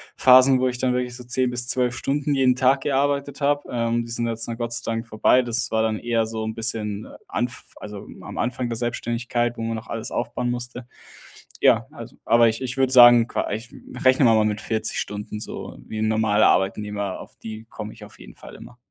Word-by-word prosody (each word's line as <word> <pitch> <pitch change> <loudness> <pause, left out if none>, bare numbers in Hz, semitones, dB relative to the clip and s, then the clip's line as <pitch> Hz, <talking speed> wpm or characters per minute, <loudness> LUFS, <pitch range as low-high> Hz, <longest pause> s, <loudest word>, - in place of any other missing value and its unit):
Phasen, 130 0 +6
wo 130 - +2
ich 125 - -5
dann 125 -1 +1
wirklich 125 -1 -2
so 125 -1 -10
10 125 +1 +1
bis 120 0 -1
12 125 -1 0
Stunden 145 +1 -1
jeden 130 -2 +3
Tag 130 +1 +3
gearbeitet 140 +1 -1
habe. 145 +1 +1
Ähm, 115 -1 -1
die 115 - -9
sind 120 0 -1
jetzt 115 0 -2
dann 115 -1 -5
Gott 120 -1 -3
sei 115 - -3
Dank 115 0 -4
vorbei. 110 +4 +3
Das 120 0 -1
war 110 0 +1
dann 110 -1 -1
eher 115 -1 0
so 110 0 -4
‘n 110 0 -4
bisschen 110 -2 -3 0.2
Anf 120 +1 -4
also, 105 -1 -9 0.2
am - - -9
Anfang 125 0 -2
der 115 - -3
Selbstständigkeit, 120 0 -2
wo - - -5
man 115 0 -2
noch 110 - -8
alles 115 -1 -5
aufbauen 120 +1 -2
musste. 120 0 -5 0.7
Ja, - - +4
also - - -11
aber 115 0 +5
ich 110 +3 -4
ich 130 +1 -4
würde 130 -1 +2
sagen, 120 -1 +8
qua - - -2
ich 115 +3 -5 0.3
rechnen 130 0 +5
wir 115 - +5
mal 110 -1 +3
mit 105 +1 -1
40 110 -1 -1
Stunden 105 +1 -5
so 105 - -7
wie 110 - -6
‘n 110 - +1
normaler 110 -1 +3
Arbeitnehmer, 100 0 -1
auf - - -12
die 110 0 -9
komme - - -7
ich - - -14
auf - - -18
jeden - - -13
Fall - - -13
immer. 125 - -13
120 Hz, 220 wpm, -23 LUFS, 110-125 Hz, 0.7 s, sagen